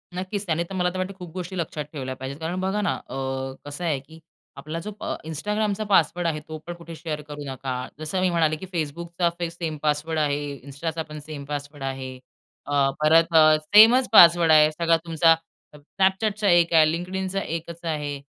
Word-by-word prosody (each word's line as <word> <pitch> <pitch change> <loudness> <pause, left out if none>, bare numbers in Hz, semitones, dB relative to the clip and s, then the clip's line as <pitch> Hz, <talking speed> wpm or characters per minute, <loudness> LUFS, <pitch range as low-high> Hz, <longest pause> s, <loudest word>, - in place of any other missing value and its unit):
नक्कीच, 190 +3 -4
त्याने 170 -2 0
तर 195 - -6
मला 180 -1 +1
तर 185 - -5
वाटतं 185 +1 -3
खूप 180 -3 -9
गोष्टी 185 0 -6
लक्षात 155 -3 -3
ठेवल्या 130 -3 -5
पाहिजेत. 130 +2 -7
कारण 165 +3 -3
बघा 190 +3 -1
ना 205 - +1 0.2
अ, - - -6 0.5
कसं 145 +4 -7
आहे 150 -5 0
की 160 +4 -16 0.4
आपला 155 +4 -5
जो 210 - -4
अ - - -2
Instagramचा 210 +6 -2
पासवर्ड 175 -2 +3
आहे 155 -2 -1
तो 155 - -6
पण 175 - -4
कुठे 170 -1 -10
शेअर 155 -2 -5
करू 145 0 -7
नका. 130 0 -4 0.2
जसं 155 +4 -2
मी 185 - +2
म्हणाले, 160 -3 +2
की 170 - -8
Facebookचा 170 +3 -1 0.2
सेम 165 -2 -5
पासवर्ड 155 +2 0
आहे, 145 -1 -1
Instaचा 160 +3 -4
पण 150 0 -7
सेम 150 -3 -7
पासवर्ड 145 0 -6
आहे, 130 -1 -5 0.5
अ, 140 -1 +2
परत 165 +2 +4
अ, 155 -1 +7
सेमच 225 +9 +6
पासवर्ड 170 -4 +8
आहे. 155 0 +6
सगळा 165 +1 +2
तुमचा 165 0 +4 0.4
Snapchatचा 195 +7 0
एक 170 -1 +4
आहे, 160 -1 +7
LinkedInचा 190 +3 -3
एकच 165 0 -5
आहे. 150 -3 -2
165 Hz, 185 wpm, -24 LUFS, 150-180 Hz, 0.5 s, पासवर्ड